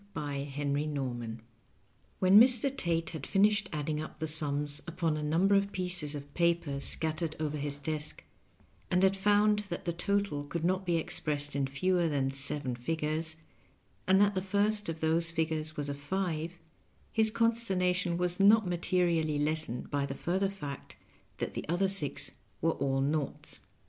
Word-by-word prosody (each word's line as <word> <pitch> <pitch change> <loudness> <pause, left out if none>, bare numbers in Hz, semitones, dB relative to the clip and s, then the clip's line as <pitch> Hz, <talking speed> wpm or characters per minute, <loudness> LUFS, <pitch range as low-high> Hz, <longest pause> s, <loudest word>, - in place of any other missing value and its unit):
Bt 145 -1 -4
henbt 145 +1 -1
kobman. 120 -4 -4 0.8
When 190 +2 +6
Mr. 255 +3 +4
Tate 165 -6 -1
had 155 -5 -7
finished 205 +1 +3
adding 150 0 -2
np 155 +1 -6
the 160 - -3
sums 145 -1 +4
upon 165 -2 -1
a 155 - -3
number 165 +7 +2
of 200 0 +2
pieces 180 -6 -1
of 145 0 -9
paper 170 -5 0
scattered 155 +2 0
over 150 -1 -2
his 145 -1 -2
desk, 155 +1 -3 0.7
and 180 +1 +2
had 190 0 +4
found 210 +1 +3
that 175 - -5
the 170 - -1
total 200 -4 -1
could 165 +3 -4
not 185 +1 0
be 170 - +2
expressed 145 -3 -2
in 140 -1 0
fewer 175 +4 +1
than 135 -3 0
seven 135 -1 -1
figures, 155 +4 -1 0.7
and 190 0 +5
that 205 0 +4
the 190 - -1
first 205 +1 0
of 160 -1 -5
those 165 +1 +2
fig 160 -1 -1
ures 155 0 -3
was 145 -1 -2
a 145 - -2
five, 165 +2 -3 0.5
his 220 -1 +3
consternation 190 -6 +1
was 180 +1 -1
not 210 +2 +6
materially 170 -3 0
lessened 150 -4 -1
by 140 -1 0
the 135 - -5
further 190 +6 -1
fact 145 -9 -8 0.4
that - - -4
the - - -4
other 175 +3 +2
six 145 -7 +3 0.3
were 165 - +2
all 135 -2 -1
naughts. 145 0 -3
160 Hz, 165 wpm, -30 LUFS, 145-185 Hz, 0.8 s, When